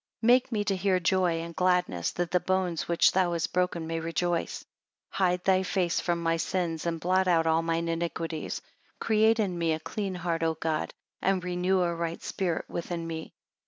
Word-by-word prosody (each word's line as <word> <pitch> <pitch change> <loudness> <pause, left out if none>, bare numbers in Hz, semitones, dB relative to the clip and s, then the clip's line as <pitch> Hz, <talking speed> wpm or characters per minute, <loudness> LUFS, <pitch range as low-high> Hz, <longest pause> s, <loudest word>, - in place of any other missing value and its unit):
31 225 - 0
Make 255 0 +2
me 210 -2 0
to 200 -1 0
hear 185 0 +1
joy 175 -1 +1
and 170 0 -7
gladness, 180 - +1
that 175 -1 -2
the 180 - +3
bones 185 -3 -1
which 170 -1 +4
thou 180 -2 +2
hast 170 - -2
broken 180 -2 0
may 165 0 -2
rejoice. 165 +1 -1
32 - - -22 0.5
Hide 180 -2 +2
thy 190 -1 +4
face 185 -2 0
from 170 -1 -1
my 165 0 +2
sins, 170 -2 -2
and 165 -1 -1
blot 185 +2 +2
out 165 -2 +3
all 160 0 +3
mine 165 0 -1
iniquities. 165 -1 -3 0.4
Create 220 +1 +3
in 185 -5 0
me 165 -1 +2
a 155 - -2
clean 195 +3 -4
heart 170 -2 -2
O 160 -1 +1
God; 155 -1 -2 0.3
and 190 -2 +1
renew 180 +1 +1
a 170 -1 +1
right 170 0 -3
spirit 175 -4 -2
within 170 0 -4
me. 160 -1 -6
175 Hz, 200 wpm, -28 LUFS, 165-185 Hz, 0.5 s, which